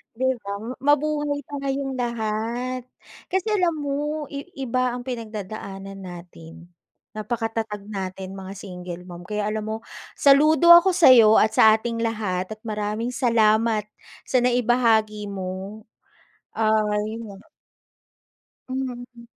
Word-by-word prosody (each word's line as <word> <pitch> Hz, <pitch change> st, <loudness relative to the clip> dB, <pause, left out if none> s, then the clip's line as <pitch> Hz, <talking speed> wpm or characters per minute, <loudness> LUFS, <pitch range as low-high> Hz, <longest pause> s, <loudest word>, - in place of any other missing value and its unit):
Di 260 Hz, +2 st, +1 dB, 0.2 s
ba? -, -, -4 dB, 0.4 s
Mabuhay 295 Hz, 0 st, +1 dB
tayong 275 Hz, -2 st, -3 dB
lahat. 235 Hz, +2 st, -2 dB, 0.4 s
Kasi 380 Hz, +3 st, -1 dB
alam 360 Hz, -6 st, +2 dB
mo, 295 Hz, +2 st, -2 dB
i 280 Hz, +2 st, -6 dB, 0.2 s
iba 255 Hz, 0 st, 0 dB
ang 245 Hz, -, -5 dB
pinagdadaanan 210 Hz, -5 st, -7 dB
natin. 175 Hz, -2 st, -11 dB, 0.5 s
Napakatatag 220 Hz, -1 st, -3 dB
natin 190 Hz, -1 st, -6 dB
mga 190 Hz, +1 st, -8 dB
single 180 Hz, -3 st, -8 dB
mom. 175 Hz, -1 st, -10 dB
Kaya 210 Hz, 0 st, -2 dB
alam 215 Hz, 0 st, -3 dB
mo 220 Hz, 0 st, -2 dB, 0.4 s
saludo 305 Hz, +4 st, +5 dB
ako 345 Hz, +2 st, +8 dB
sayo 245 Hz, -10 st, +7 dB
at 215 Hz, -, +5 dB
sa 220 Hz, 0 st, +8 dB
ating 230 Hz, +1 st, -3 dB
lahat. 210 Hz, -5 st, -2 dB
At 215 Hz, -, -30 dB
maraming 215 Hz, +2 st, -3 dB
salamat 220 Hz, -3 st, +2 dB, 0.3 s
sa 255 Hz, -, +1 dB
naibahagi 235 Hz, -4 st, +2 dB
mo. 195 Hz, +2 st, -6 dB, 0.7 s
Ah 215 Hz, -1 st, +1 dB, 0.2 s
yun. 220 Hz, -3 st, -9 dB, 1.2 s
Hmm. 245 Hz, -2 st, -6 dB
225 Hz, 115 wpm, -23 LUFS, 210-255 Hz, 1.2 s, ako